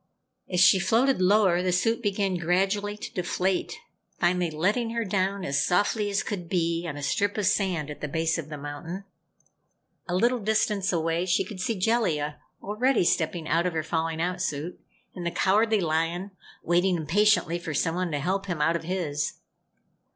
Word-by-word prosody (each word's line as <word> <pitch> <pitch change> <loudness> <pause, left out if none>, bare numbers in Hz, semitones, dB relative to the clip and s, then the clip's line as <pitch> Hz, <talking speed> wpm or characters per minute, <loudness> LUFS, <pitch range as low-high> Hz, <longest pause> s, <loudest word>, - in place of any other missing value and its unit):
As 180 - +1
she 180 +2 +7
floated 240 +3 +2
lower, 185 -2 +4
the 180 0 0
suit 225 +7 +1
began 200 -3 0
gradually 195 +4 0
to - - -8
deflate, 180 +1 -1 0.4
finally 175 0 +2
letting 205 +10 0
her 230 -1 -1
down 195 0 -1
as 140 +1 +1
softly 205 +3 +1
as 200 0 0
could 180 -6 -5
be, 170 -1 0
on 145 -3 -5
a 145 - -6
strip 205 +9 0
of 210 - 0
sand 185 -7 0
at 150 - -10
the 150 - -2
base 165 +3 0
of 155 -2 -7
the 150 - -6
mountain. 145 +6 -6 1.1
A 175 - 0
little 240 +6 +2
distance 210 -2 +1
away 165 +1 0
she 180 - +2
could 205 -4 -9
see 220 +2 -1
Jellia, 175 -9 0 0.2
already 225 +3 +1
stepping 165 -1 0
out 170 +3 +2
of 180 - -3
her 160 -1 -1
falling 160 0 -2
out 180 +2 -1
suit, 155 0 -3 0.3
and 180 - -7
the 170 - 0
Cowardly 210 +4 +2
Lion, 165 +4 -1 0.3
waiting 175 +2 +2
impatiently 175 +1 +2
for 160 -3 -5
someone 175 +4 0
to 150 - -1
help 190 +6 -1
him 175 -4 -3
out 165 +3 +2
of 170 - -2
his. 160 -4 -2
180 Hz, 180 wpm, -26 LUFS, 165-200 Hz, 1.1 s, she